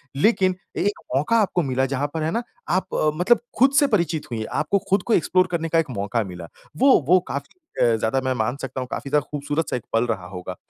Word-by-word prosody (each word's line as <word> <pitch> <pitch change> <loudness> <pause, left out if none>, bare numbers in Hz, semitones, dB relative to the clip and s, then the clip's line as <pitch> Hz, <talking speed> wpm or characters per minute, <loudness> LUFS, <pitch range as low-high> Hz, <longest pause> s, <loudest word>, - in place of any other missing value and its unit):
लेकिन 185 +3 +3 0.2
एक 205 +1 0 0.2
मौका 150 +12 +2
आपको 185 -3 +1
मिला 130 -1 0
जहाँ 135 +2 -1
पर 160 -1 -2
है 160 - 0
ना 230 +7 -1 0.3
आप 185 +2 +1 0.3
मतलब 185 +9 +4 0.2
ख़ुद 265 +2 +6
से 285 - +4
परिचित 170 - 0
हुई 115 - -2
हैं। 110 - -4
आपको 155 +7 +1
ख़ुद 195 -1 +2
को 235 - 0
एक्सप्लोर 185 +1 +3
करने 165 -1 -1
का 165 - +3
एक 160 - -1
मौका 105 +3 -1
मिला। 90 -3 -8 0.3
वो 265 +1 +6
वो 180 +3 +6
काफ़ी 140 - -6 0.2
अ, 120 -2 +4
ज़्यादा 110 +4 0
मैं 130 - +1
मान 120 +1 -1
सकता 130 0 -4
हूँ 125 - -5
काफ़ी 140 - -4
ज़्यादा 150 0 +2
ख़ूबसूरत 145 +1 -2
सा - - -1
एक 120 - -9
पल 115 +1 +3
रहा 95 -6 -3
होगा। 90 0 -7
150 Hz, 235 wpm, -23 LUFS, 120-185 Hz, 0.3 s, ख़ुद